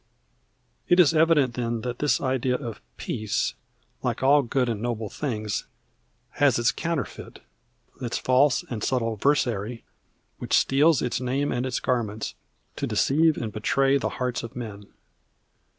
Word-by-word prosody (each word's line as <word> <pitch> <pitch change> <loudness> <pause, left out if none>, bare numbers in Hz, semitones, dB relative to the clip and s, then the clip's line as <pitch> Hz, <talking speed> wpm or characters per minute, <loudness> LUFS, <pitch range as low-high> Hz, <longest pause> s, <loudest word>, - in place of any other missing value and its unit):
It 175 - +4
is 165 -3 +6
evident, 155 -5 +4
then, 115 -1 -2
that 120 +1 -4
this 150 - +2
idea 130 -1 0
of 120 -5 -6 0.2
"peace," 110 -1 -2 0.5
like - - -2
all 145 +2 +6
good 125 0 0
and 110 -3 -2
noble 115 -3 -3
things, 110 -7 -3 0.7
has 140 -4 +4
its 120 -1 +3
counterfeit, 170 0 -4 0.6
its 120 -2 -2
false 130 +1 +3
and 110 -4 -5
subtle 115 -4 0
versary, 115 -3 0 0.6
which - - +2
steals 145 +2 +3
its 125 0 -1
name 135 +3 0
and 125 +1 -1
its 125 - -2
garments 110 -4 -2 0.4
to - - -2
deceive 155 +3 +3
and 110 -3 -4
betray 135 +6 +2
the - - -1
hearts 125 -1 -1
of 115 - -9
men. 105 -4 -7
125 Hz, 145 wpm, -25 LUFS, 115-140 Hz, 0.7 s, is